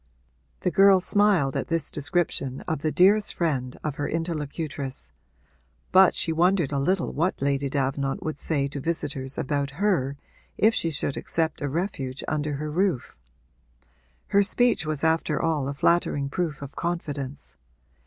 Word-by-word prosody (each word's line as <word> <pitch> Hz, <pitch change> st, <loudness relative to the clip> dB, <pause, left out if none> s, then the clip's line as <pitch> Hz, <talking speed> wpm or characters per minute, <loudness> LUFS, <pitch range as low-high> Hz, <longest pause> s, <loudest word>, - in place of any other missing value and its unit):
The 180 Hz, -, 0 dB
girl 195 Hz, 0 st, +6 dB
smiled 190 Hz, -8 st, +2 dB
at -, -, -2 dB
this 165 Hz, -1 st, -1 dB
description 145 Hz, -4 st, -1 dB
of 160 Hz, -4 st, -3 dB
the 155 Hz, -, 0 dB
dearest 200 Hz, +5 st, +4 dB
friend 135 Hz, -7 st, -1 dB
of 150 Hz, -3 st, -3 dB
her 145 Hz, -, -2 dB
interlocutress, 155 Hz, -4 st, -4 dB, 0.8 s
but 190 Hz, 0 st, +6 dB
she 165 Hz, -, +1 dB
wondered 175 Hz, -2 st, +2 dB
a 140 Hz, -, 0 dB
little 180 Hz, +6 st, 0 dB
what 170 Hz, +5 st, 0 dB
Lady 140 Hz, 0 st, 0 dB
Davenant 135 Hz, 0 st, -1 dB
would 155 Hz, -2 st, -4 dB
say 140 Hz, -4 st, 0 dB
to 145 Hz, -, -6 dB
visitors 140 Hz, -3 st, -3 dB
about 140 Hz, 0 st, -2 dB
her 165 Hz, -10 st, +1 dB, 0.4 s
if 220 Hz, +2 st, +4 dB
she 165 Hz, -, 0 dB
should 145 Hz, -2 st, 0 dB
accept 160 Hz, -2 st, -2 dB
a 145 Hz, -, -1 dB
refuge 140 Hz, -5 st, -3 dB
under 150 Hz, -1 st, -1 dB
her 150 Hz, +2 st, -4 dB
roof. 175 Hz, -5 st, -1 dB, 1.1 s
Her 200 Hz, -, +4 dB
speech 225 Hz, -3 st, +3 dB
was 155 Hz, -1 st, -1 dB
after 160 Hz, -2 st, +1 dB
all 155 Hz, -5 st, 0 dB
a 140 Hz, -, -2 dB
flattering 145 Hz, -3 st, +1 dB
proof 155 Hz, -2 st, -3 dB
of 140 Hz, -, -9 dB
confidence. 145 Hz, -5 st, -4 dB
155 Hz, 155 wpm, -25 LUFS, 140-175 Hz, 1.1 s, girl